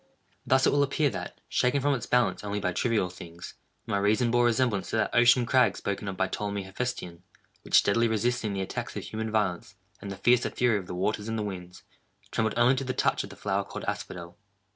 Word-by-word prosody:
Thus 130 0 +4
it - - +4
will 145 - +3
appear 140 0 +1
that, - - -7
shaken 125 +3 +1
from 145 +1 +2
its 125 -3 -3
balance 125 -3 +2
only 105 0 -2
by 90 -3 -1
trivial 110 -6 0
things, 85 -1 -10 0.3
my 100 - 0
reason 110 +4 +2
bore 120 0 +3
resemblance 120 -4 +1
to - - -2
that 110 - 0
ocean 120 +1 +5
crag 125 +1 +3
spoken 100 0 -3
of 95 -1 -4
by 95 - +2
Ptolemy 100 0 -3
Hephestion, 95 -4 -5 0.4
which - - -1
steadily 115 +3 +3
resisting 110 0 0
the 95 - -2
attacks 95 - -5
of - - -4
human 110 0 -4
violence, 100 -3 -1 0.3
and 100 - -6
the 95 - -6
fiercer 120 0 +3
fury 120 -4 +1
of 90 - -10
the 90 - -5
waters 105 +3 -1
and 115 0 -2
the 110 - -1
winds, 90 -3 -7 0.5
trembled 110 -1 0
only 120 +2 +5
to 135 - -1
the 130 -1 -2
touch - - +1
of - - -8
the - - -11
flower - - -1
called - - -7
Asphodel. 85 0 -5
110 Hz, 220 wpm, -28 LUFS, 95-120 Hz, 0.5 s, ocean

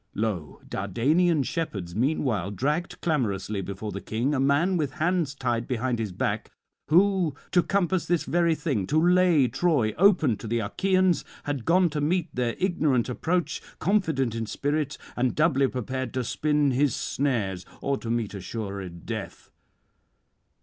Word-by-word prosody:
'Lo, 95 -10 -3
Dardanian 145 - +1
shepherds 100 - -3
meanwhile 120 - 0
dragged 150 - -2
clamorously 105 - -1
before 100 +2 -5
the 100 - -5
King 120 +7 -1
a 135 - 0
man 145 +7 +3
with 150 -5 -1
hands 160 -2 0
tied 120 -3 -1
behind 125 -1 -1
his 110 -4 -2
back, 90 - -2 0.4
who 180 -1 +3 0.2
to 180 - +5
compass 185 -2 0
this 175 -1 +1
very 170 -1 +2
thing, 140 - -1
to 155 - +2
lay 175 -5 +4
Troy 125 -3 +1
open 170 - +4
to 115 - -8
the 120 +2 0
Achaeans, 185 - +1 0.2
had 145 -5 -3
gone 180 +2 +4
to 150 -1 -2
meet 170 +2 0
their 120 -2 -1
ignorant 155 - +1
approach, 170 +7 -1 0.2
confident 160 - +1
in 115 -1 -3
spirit 145 +3 -1 0.2
and 125 0 0
doubly 145 -4 +3
prepared 130 0 -4
to 130 - 0
spin 150 +3 +1
his 135 +2 +2
snares 105 -10 -1 0.2
or 140 0 0
to 115 - -7
meet 115 -3 -1
assured 100 -3 -6
death. - - -6
140 Hz, 150 wpm, -26 LUFS, 115-165 Hz, 0.4 s, to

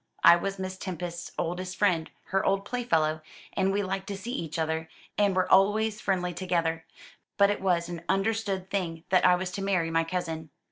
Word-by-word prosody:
I 170 - +10
was 195 +3 -3
Miss 185 0 -5
Tempest's 175 -2 -5
oldest 180 +2 -3
friend 175 -6 +2 0.2
her 195 0 +1
old 195 0 +1
playfellow, 165 -10 0 0.3
and 190 0 +1
we 205 +1 0
liked 190 0 -3
to 200 - -4
see 200 +5 -6
each 165 - -4
other, 160 0 -1 0.3
and 200 -2 +2
were 185 - +2
always 210 +3 +4
friendly 180 -3 0
together. 170 -2 -1 0.5
But 200 0 +5
it 205 - -3
was 175 -3 +1
an 175 -1 -6
understood 195 -2 0
thing 165 -5 -2
that 185 -1 +4
I 180 - +6
was 180 0 -3
to 195 - -4
marry 185 -4 +1
my 165 0 +3
cousin. 165 -2 -4
185 Hz, 190 wpm, -28 LUFS, 170-195 Hz, 0.5 s, I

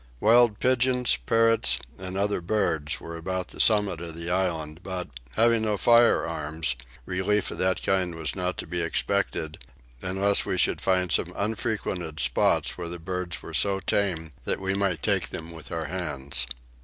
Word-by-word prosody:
Wild 115 - +5
pigeons, 125 - +2
parrots, 115 - +3 0.2
and 95 0 -4
other 100 -1 0
birds 80 -6 0
were 85 0 -8
about 95 +2 -3
the - - -11
summit 105 -6 +3
of 85 -2 -6
the 85 +1 -4
island 80 -4 -1
but, 90 -3 -5 0.3
having 115 0 +4
no 105 -2 0
firearms, 80 - +3 0.3
relief 95 +2 0
of - - -7
that 95 -1 +1
kind 90 -3 +1
was 80 -6 -3
not 90 0 -2
to - - -4
be 85 +2 -1
expected 80 -3 -1 0.4
unless 95 +2 +2
we 95 - -2
should - - +2
find 90 -2 +1
some - - +2
unfrequented 100 -6 -2
spot - - +3
where 85 -1 -4
the 90 - -5
birds 90 -1 -4
were 80 - -9
so 95 +4 +2
tame 85 -4 -1
that - - 0
we 95 0 0
might 95 -6 0
take - - +1
them 80 +1 -7
with 80 -2 -11
our 80 -1 -2
hands. 75 -7 -3
90 Hz, 165 wpm, -26 LUFS, 80-100 Hz, 0.4 s, Wild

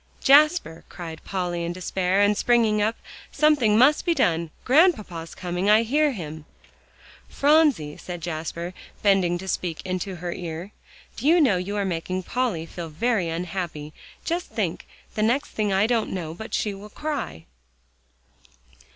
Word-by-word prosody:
"Jasper," 295 - +4
cried 165 -3 -8
Polly 175 -3 -2
in 170 +1 -3
despair, 185 +1 0
and 205 +1 +4
springing 225 -2 +2
up, 220 +2 +1 0.4
"something 285 -9 +3
must 275 +6 +5
be 340 -2 +1
done. 170 - +1 0.2
Grandpapa's 235 - +2
coming; 180 +2 -2
I 215 +2 +6
hear 295 +6 +2
him." 155 -6 -7 0.8
"Phronsie," 280 - +3
said 175 -1 -7
Jasper, 170 +1 -5 0.3
bending 190 -4 +3
to 190 +2 -8
speak 175 -3 -2
into 185 +1 -3
her 175 0 -4
ear, 175 +2 -6 0.5
"do 260 - -2
you 340 +3 +6
know 245 - +4
you 190 +3 -4
are 200 - 0
making 185 +1 -3
Polly 225 -8 -1
feel 165 0 -7
very 185 +2 0
unhappy? 165 -3 -4 0.3
Just 345 +1 -2
think; - - -3 0.3
the 215 - -2
next 245 +7 +1
thing 210 -2 -1
I 195 +2 +3
don't 230 -1 +1
know 165 -4 -4
but 220 +6 -8
what - - -11
she'll 205 0 -3
cry." 280 - -5
195 Hz, 150 wpm, -24 LUFS, 170-240 Hz, 0.8 s, I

